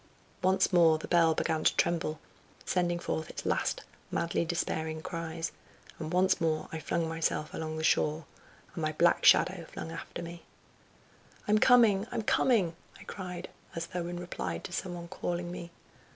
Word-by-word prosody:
Once 190 +1 +3
more 165 -3 +6
the 155 - -7
bell 165 -2 +4
began 155 0 0
to - - +4
tremble, 165 -2 0 0.5
sending 175 -1 +1
forth 160 -2 -3
its - - -7
last - - 0 0.3
madly 170 0 0
despairing 160 -2 -2
cries, 165 0 -4 0.5
and 160 -1 -4
once 185 +1 +3
more 160 -1 0
I 160 - -3
flung 165 +1 -1
myself 160 -1 -1
along 155 0 -4
the 160 - -3
shore, 155 0 +2 0.5
and 165 - -5
my 155 0 0
black 170 +3 +3
shadow 180 -2 +5
flung 165 - -6
after 165 +1 -6
me. 170 0 -8 1.1
"I'm 210 +1 +4
coming, 225 -5 +5
I'm 230 -2 -2
coming!" 205 -8 +2 0.2
I - - -11
cried, 180 -2 -6 0.3
as 165 0 -2
though 175 0 -4
in 175 0 -4
reply 175 - -4
to - - -8
some 180 -1 -3
one 170 0 -7
calling 175 -1 -3
me. 175 -1 -7
170 Hz, 165 wpm, -30 LUFS, 160-180 Hz, 1.1 s, more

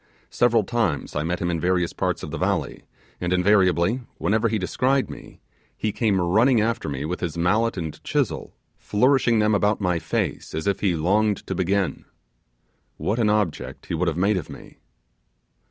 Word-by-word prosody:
Several 120 -2 +3
times 105 - -1
I 75 - 0
met 85 +3 -1
him 85 0 -1
in 85 - -1
various 90 0 0
parts - - -2
of - - -6
the - - -4
valley, - - -1 0.4
and, 90 0 -2
invariably, 90 +3 +3 0.2
whenever 110 +2 +1
he 110 - 0
descried 130 +8 0
me, - - -12 0.4
he 110 - -1
came 105 -3 +1
running 110 +8 +3
after 115 -5 -1
me 70 0 -4
with 90 +3 -3
his 85 -2 -4
mallet 105 +7 +1
and 80 -4 -5
chisel, - - -2 0.2
flourishing 125 +1 +2
them 105 0 +3
about 105 +1 +2
my 90 -4 0
face 80 -1 -3
as 80 - -3
if 100 -1 0
he 95 -4 +1
longed 100 +6 +1
to - - -3
begin. 95 -3 -1 0.9
What 110 +4 -1
an 110 -3 +3
object 105 -6 -1
he - - -5
would 85 +2 0
have 80 -1 -1
made 100 +3 +2
of 85 - -5
me! - - -12
100 Hz, 180 wpm, -23 LUFS, 85-110 Hz, 0.9 s, Several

